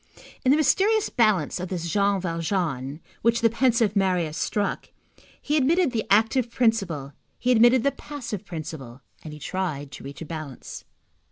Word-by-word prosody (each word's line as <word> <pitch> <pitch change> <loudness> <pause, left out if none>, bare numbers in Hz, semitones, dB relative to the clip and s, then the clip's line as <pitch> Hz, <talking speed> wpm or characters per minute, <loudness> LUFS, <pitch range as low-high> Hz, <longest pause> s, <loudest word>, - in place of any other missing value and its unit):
In 255 - +2
the 285 - +5
mysterious 395 +9 +2
balance 210 - +2
of 180 0 -5
this 170 -3 -3
Jean 200 +2 +2
Valjean 165 -5 -2 0.2
which 230 +1 +2
the 230 -1 +4
pensive 230 -4 +2
Marius 180 -5 +1
struck, 205 +3 -2 0.5
he 295 - -1
admitted 310 +2 +3
the 225 -3 -2
active 225 +4 +3
principle, 195 - 0 0.2
he 250 - +1
admitted 240 +1 +5
the 280 - +3
passive 265 -8 -7
principle, 155 - -8 0.2
and 155 - -8
he 150 - -9
tried 150 -3 -4
to - - -10
reach 140 +4 -8
a - - -9
balance. 155 -4 -8
200 Hz, 160 wpm, -25 LUFS, 160-240 Hz, 0.5 s, the